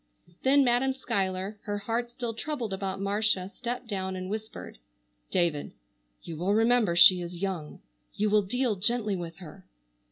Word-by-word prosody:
Then 275 +1 +5
Madam 255 +1 +2
Schuyler, 195 -4 -2
her 205 0 -2
heart 230 +4 -2
still 240 -1 -4
troubled 235 -3 -4
about 190 0 -3
Marcia, 200 -1 0
stepped 245 +1 -4
down 190 -3 -3
and 185 +1 -5
whispered: 220 - -6 0.5
"David, 165 -5 0 0.5
you 165 - -7
will 190 +5 +1
remember 225 -5 +3
she 180 +1 +8
is 175 +1 -6
young. 180 -6 -4 0.3
You 210 0 +1
will 210 0 +5
deal 235 +3 0
gently 215 +1 0
with 170 -2 -6
her?" 185 +1 -12
205 Hz, 155 wpm, -28 LUFS, 185-235 Hz, 0.5 s, she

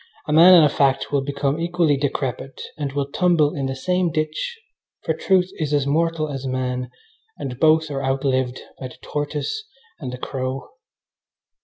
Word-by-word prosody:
A 150 - 0
man 175 +4 +9
and 165 -3 +8
a - - +4
fact 135 -1 +1
will 140 -1 +2
become 140 +2 -1
equally 170 -3 +2
decrepit 135 -1 -3 0.2
and 145 -3 -3
will 140 0 0
tumble 170 -5 +3
in 135 -2 -2
the 135 - -3
same 180 +6 0
ditch, 155 - -2 0.4
for - - 0
truth 185 -1 +2
is 150 -2 0
as 140 -2 +1
mortal 160 +2 +1
as 135 -2 -5
man, 125 -1 -2 0.5
and 125 -2 -6
both 160 0 +4
are 135 -1 -3
outlived 130 -1 0 0.2
by 130 - -5
the 125 - -14
tortoise 150 - -3 0.4
and 130 -5 -5
the 125 - -6
crow. 130 0 -4
145 Hz, 170 wpm, -22 LUFS, 135-160 Hz, 0.5 s, man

